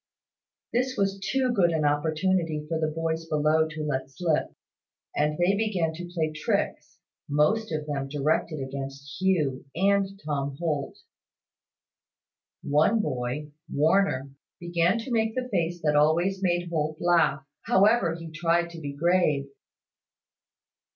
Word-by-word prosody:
This 255 Hz, +2 st, 0 dB
was 195 Hz, 0 st, 0 dB
too 260 Hz, +5 st, 0 dB
good 185 Hz, -6 st, +4 dB
an 160 Hz, -2 st, 0 dB
opportunity 155 Hz, +2 st, 0 dB
for 160 Hz, 0 st, -1 dB
the 155 Hz, -, +1 dB
boys 160 Hz, +1 st, -2 dB
below 155 Hz, +1 st, +2 dB
to 155 Hz, 0 st, -6 dB
let 135 Hz, -3 st, -2 dB
slip; 160 Hz, +2 st, 0 dB, 0.7 s
and 150 Hz, +1 st, +1 dB
they 180 Hz, +3 st, +3 dB
began 195 Hz, -7 st, 0 dB
to 175 Hz, +2 st, -7 dB
play 160 Hz, -3 st, -1 dB
tricks, 155 Hz, 0 st, -2 dB, 0.3 s
most 160 Hz, +10 st, +2 dB
of 155 Hz, -1 st, -2 dB
them 140 Hz, -2 st, -3 dB
directed 150 Hz, +2 st, 0 dB
against 140 Hz, +3 st, -7 dB
Hugh 155 Hz, -9 st, +1 dB
and 195 Hz, +2 st, +1 dB
Tom 140 Hz, -2 st, -2 dB
Holt. 150 Hz, -4 st, -2 dB, 1.7 s
One 155 Hz, +10 st, +3 dB
boy, 135 Hz, -, -3 dB, 0.2 s
Warner, 150 Hz, -3 st, +2 dB, 0.3 s
began 175 Hz, +3 st, +1 dB
to 230 Hz, +3 st, -6 dB
make 225 Hz, -1 st, +1 dB
the 255 Hz, -1 st, -2 dB
face 175 Hz, -4 st, -1 dB
that 150 Hz, -1 st, +2 dB
always 170 Hz, +6 st, +3 dB
made 175 Hz, -2 st, 0 dB
Holt 155 Hz, -1 st, -1 dB
laugh, 155 Hz, -5 st, +2 dB, 0.2 s
however 200 Hz, -3 st, +4 dB
he 165 Hz, -1 st, -8 dB
tried 170 Hz, +2 st, +1 dB
to 165 Hz, -1 st, -9 dB
be 140 Hz, -2 st, -5 dB
grave. 150 Hz, -3 st, +1 dB
160 Hz, 135 wpm, -27 LUFS, 150-185 Hz, 1.7 s, good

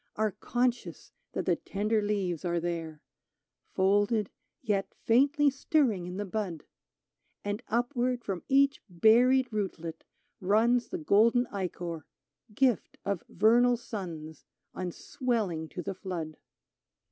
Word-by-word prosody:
Are 215 Hz, 0 st, +1 dB
conscious 245 Hz, +4 st, -2 dB, 0.2 s
that -, -, -2 dB
the -, -, +2 dB
tender 210 Hz, +2 st, -1 dB
leaves 195 Hz, -5 st, -1 dB
are 175 Hz, -1 st, 0 dB
there 165 Hz, -3 st, -4 dB, 0.3 s
— -, -, -46 dB
Folded, 205 Hz, +2 st, +2 dB, 0.3 s
yet 205 Hz, -4 st, -1 dB
faintly 280 Hz, +5 st, +3 dB
stirring 260 Hz, -, +1 dB
in 180 Hz, +1 st, -6 dB
the 205 Hz, -, -2 dB
bud; 190 Hz, -5 st, -4 dB, 0.8 s
And 205 Hz, +2 st, -2 dB
upward 245 Hz, +1 st, 0 dB
from 190 Hz, -5 st, -3 dB
each 275 Hz, +1 st, +4 dB
buried 240 Hz, +7 st, +4 dB
rootlet 170 Hz, -6 st, -4 dB, 0.4 s
runs 230 Hz, +6 st, +3 dB
The 365 Hz, -, -4 dB
golden 245 Hz, -, +4 dB
ichor, 175 Hz, -4 st, -4 dB, 0.5 s
gift 250 Hz, -5 st, +1 dB
of 200 Hz, -3 st, -2 dB
vernal 240 Hz, +4 st, +4 dB
suns. 165 Hz, -9 st, -7 dB, 0.3 s
On 180 Hz, -1 st, -4 dB
swelling 200 Hz, -, -2 dB
to 180 Hz, -, -6 dB
the 195 Hz, -, -3 dB
flood. 175 Hz, -5 st, -5 dB
205 Hz, 125 wpm, -29 LUFS, 180-245 Hz, 0.8 s, each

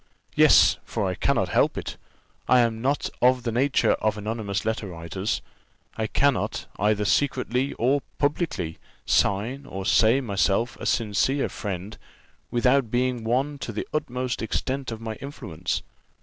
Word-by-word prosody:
Yes, -, -, +6 dB
for -, -, -2 dB
I -, -, 0 dB
cannot -, -, +1 dB
help -, -, +2 dB
it -, -, -5 dB, 0.5 s
I 125 Hz, -1 st, +6 dB
am 115 Hz, -1 st, 0 dB
not 140 Hz, +4 st, 0 dB
of 125 Hz, 0 st, +4 dB
the 120 Hz, -, -1 dB
nature 135 Hz, +4 st, +2 dB
of 110 Hz, -1 st, +1 dB
anonymous 105 Hz, -1 st, -3 dB
letter 110 Hz, -1 st, -1 dB
writers; 85 Hz, +3 st, -3 dB, 0.5 s
I 110 Hz, -1 st, -1 dB
cannot, 140 Hz, +2 st, +1 dB
either 105 Hz, +1 st, +2 dB
secretly 130 Hz, +2 st, +1 dB
or 135 Hz, +4 st, +1 dB, 0.2 s
publicly, 145 Hz, -, -1 dB, 0.3 s
sign 120 Hz, +8 st, +1 dB
or 95 Hz, 0 st, -6 dB
say 115 Hz, +5 st, +4 dB
myself 110 Hz, 0 st, 0 dB
a -, -, -4 dB
sincere 120 Hz, +5 st, +1 dB
friend, 100 Hz, 0 st, -5 dB, 0.5 s
without 125 Hz, +1 st, +2 dB
being 125 Hz, 0 st, 0 dB
one 135 Hz, +5 st, 0 dB
to 120 Hz, -, -4 dB
the 105 Hz, -, -4 dB
utmost 125 Hz, -4 st, -2 dB
extent 130 Hz, +3 st, -2 dB
of 115 Hz, 0 st, -6 dB
my 110 Hz, -1 st, -4 dB
influence. 90 Hz, -, -4 dB
115 Hz, 145 wpm, -25 LUFS, 105-130 Hz, 0.5 s, Yes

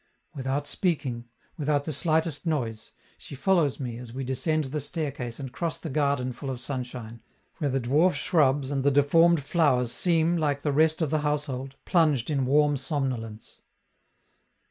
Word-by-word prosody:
Without 135 Hz, +1 st, -2 dB
speaking, 140 Hz, -10 st, -1 dB, 0.3 s
without 145 Hz, -2 st, 0 dB
the 155 Hz, -, -2 dB
slightest 160 Hz, +2 st, 0 dB
noise, 115 Hz, -9 st, -2 dB, 0.3 s
she -, -, -10 dB
follows 165 Hz, -2 st, +2 dB
me 120 Hz, -3 st, -5 dB
as 125 Hz, -2 st, -9 dB
we 135 Hz, +1 st, -4 dB
descend 135 Hz, +5 st, 0 dB
the 145 Hz, +2 st, -3 dB
staircase 140 Hz, -5 st, -4 dB
and 135 Hz, -2 st, -6 dB
cross 165 Hz, +4 st, -3 dB
the 160 Hz, -, -7 dB
garden 140 Hz, -3 st, 0 dB
full 135 Hz, +3 st, -7 dB
of 130 Hz, -2 st, -4 dB
sunshine, 125 Hz, -4 st, -5 dB, 0.4 s
where 145 Hz, -, 0 dB
the 135 Hz, 0 st, 0 dB
dwarf 150 Hz, +9 st, +3 dB
shrubs 145 Hz, -4 st, +2 dB
and 135 Hz, -2 st, -1 dB
the 140 Hz, -, +4 dB
deformed 150 Hz, +3 st, +4 dB
flowers 135 Hz, -6 st, +2 dB
seem, 170 Hz, +1 st, +2 dB
like 145 Hz, -3 st, -1 dB
the 145 Hz, -, 0 dB
rest 160 Hz, +2 st, +3 dB
of 150 Hz, -, -2 dB
the 155 Hz, -, +2 dB
household, 145 Hz, -3 st, -2 dB
plunged 155 Hz, -7 st, +2 dB
in 135 Hz, -3 st, 0 dB
warm 145 Hz, +1 st, +3 dB
somnolence. 130 Hz, -6 st, -4 dB
140 Hz, 165 wpm, -27 LUFS, 130-155 Hz, 0.4 s, the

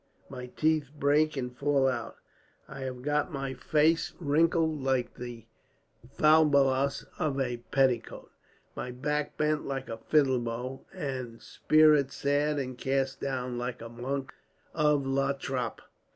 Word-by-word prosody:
My 125 Hz, -2 st, -7 dB
teeth 155 Hz, +1 st, 0 dB
break 145 Hz, +2 st, +2 dB
and 125 Hz, -1 st, -4 dB
fall 140 Hz, 0 st, +2 dB
out. 130 Hz, -, -2 dB, 0.5 s
I 135 Hz, -, -9 dB
have 130 Hz, -2 st, -5 dB
got 150 Hz, +1 st, 0 dB
my 135 Hz, -2 st, -3 dB
face 155 Hz, +5 st, +2 dB
wrinkled 160 Hz, 0 st, +2 dB
like 130 Hz, -2 st, 0 dB
the 120 Hz, -2 st, -8 dB, 0.7 s
falbalas 140 Hz, -3 st, +4 dB
of 150 Hz, -5 st, 0 dB
a 125 Hz, -2 st, -1 dB
petticoat, 130 Hz, -4 st, 0 dB, 0.4 s
my 125 Hz, -, -4 dB
back 150 Hz, +4 st, -2 dB
bent 150 Hz, 0 st, 0 dB
like 135 Hz, -1 st, -4 dB
a 115 Hz, -, -5 dB
fiddle 135 Hz, -1 st, +3 dB
bow, 120 Hz, +3 st, -5 dB
and 130 Hz, -9 st, -5 dB
spirit 155 Hz, -3 st, +4 dB
sad 145 Hz, +1 st, 0 dB
and 130 Hz, -3 st, -4 dB
cast 135 Hz, 0 st, -1 dB
down 125 Hz, -2 st, -3 dB
like 125 Hz, 0 st, -4 dB
a 115 Hz, -, -8 dB
monk 130 Hz, +3 st, -4 dB, 0.4 s
of 150 Hz, -3 st, +2 dB
La 135 Hz, +1 st, +1 dB
Trappe. 130 Hz, -3 st, -4 dB
135 Hz, 135 wpm, -29 LUFS, 125-150 Hz, 0.7 s, falbalas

